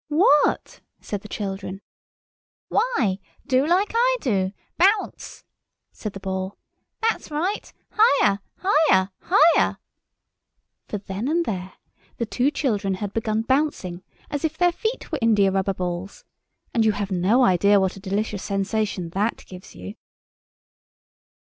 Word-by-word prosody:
"What?" 300 -1 +3 0.2
said 205 -2 -5
the 210 - -10
children. 195 -2 -5 0.9
"Why, 250 - +1 0.3
do 260 -1 +3
like 370 +5 +2
I - - +3
do—bounce!" 255 - -1 0.5
said 215 -2 -6
the 195 - -7
Ball. 190 0 -4 0.5
"That's 455 - 0
right—higher, 315 - +1 0.2
higher, 295 - +3
higher!" 340 -3 +4 1.1
For 210 - -3
then 200 +4 -5
and 335 +3 +1
there 185 -5 -4 0.4
the 235 - -1
two 250 +4 +1
children 210 -10 -1
had 200 +1 -5
begun 220 -1 -1
bouncing 260 - 0 0.3
as 290 -1 -3
if 315 0 -1
their 355 0 +4
feet 440 +5 -4
were 310 - -1
india 210 -4 +4
rubber 195 0 0
balls, 180 +2 -5 0.5
and 230 - +3
you 215 -1 +3
have 205 -1 -4
no 190 +8 +3
idea 200 +2 +4
what 190 -1 0
a - - -10
delicious 200 +1 -2
sensation 195 -3 -2
that 205 +5 -1
gives 185 - -12
you. 90 +2 -8
210 Hz, 130 wpm, -23 LUFS, 190-300 Hz, 1.1 s, higher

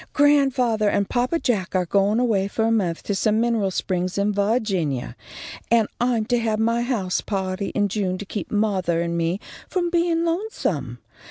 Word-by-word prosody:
"Grandfathah 265 -7 +3
and 200 - +1
papa 250 +6 0
Jack 205 - -1
are 180 -1 +2
goin' 200 +5 +2
away 215 -6 +1
fo' 220 +2 -2
a 225 - +2
month 185 -7 0
to 205 - -2
some 215 +2 +1
mineral 230 -4 +1
springs 185 0 -2
in 205 +1 +1
Va'ginia, 200 - 0 0.6
and 230 -2 +4
I'm 240 -3 +1
to 245 +1 +1
have 220 -2 0
my 230 +2 +1
house 225 -7 -1
pahty 190 -1 -3
in 205 -1 +2
June 190 -2 -1
to 205 - -7
keep 200 -2 -5
mothah 195 -5 +1
and 170 0 -1
me 170 +3 0 0.3
from 350 -2 -1
bein' 335 -1 +1
lonesome. 275 - -2
210 Hz, 175 wpm, -23 LUFS, 185-240 Hz, 0.6 s, and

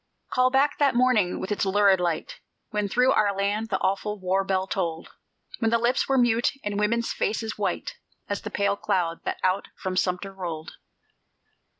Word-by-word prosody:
Call 255 0 +3
back 275 +2 +2
that 280 -4 +3
morning, 240 -7 +3
with 190 - -5
its 205 - 0
lurid 195 -1 +4
light, 170 -3 -2 0.3
When 210 -1 0
through 250 +5 +3
our 205 -2 +2
land 205 +3 -1
the 190 - +1
awful 210 +2 -1
war 190 +1 +1
bell 190 -1 0
tolled; 165 -3 -3 0.5
When 225 - +2
lips 235 +4 +1
were 270 - +3
mute, 240 +1 +3
and 205 0 -2
women's 230 +3 0
faces 220 0 -2
white - - -2 0.3
As 205 - -3
the 215 - -5
pale 200 -1 +1
cloud 170 -4 -1
that - - -2
out 185 +1 +1
from 185 -1 -4
Sumter 185 +1 -1
rolled. 170 -4 -6
205 Hz, 175 wpm, -25 LUFS, 190-230 Hz, 0.5 s, lurid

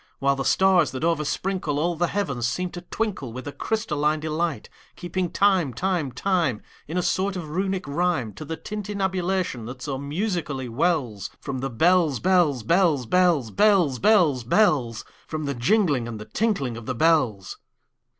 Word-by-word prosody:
While 140 0 +2
the 135 - -3
stars, 185 -4 +4
that 130 - -5
oversprinkleAll 165 0 -1
the 175 - +2
heavens, 140 -12 -1
seem 180 +8 -2
to 175 - -7
twinkleWith 160 - -4
a 145 - -4
crystalline 155 -8 -1
delight; 155 0 -2 0.3
Keeping 180 0 -3
time, 185 - +2
time, 180 -4 -1
time, 160 - 0 0.2
In 165 +4 -4
a 180 - +1
sort 190 +3 0
of 165 -5 -6
Runic 190 0 -2
rhyme, 140 -7 0
To 125 - -8
the 160 +2 -5
tintinnabulation 190 - -2
that 125 0 -8
so 135 -2 -3
musically 150 - -3
wellsFrom 130 - -2
the 135 - -2
bells, 160 +1 +3
bells, 170 -9 +2
bells, 165 - +2
bells, 170 -7 +2
Bells, 195 -10 +3
bells, 175 - +4
bells—From 145 - 0
the 140 - -1
jingling 145 - +1
and 115 -2 -6
the 105 - -8
tinkling 140 - -1
of 115 - -10
the 130 - -2
bells. 125 - +1
160 Hz, 150 wpm, -24 LUFS, 130-185 Hz, 0.3 s, stars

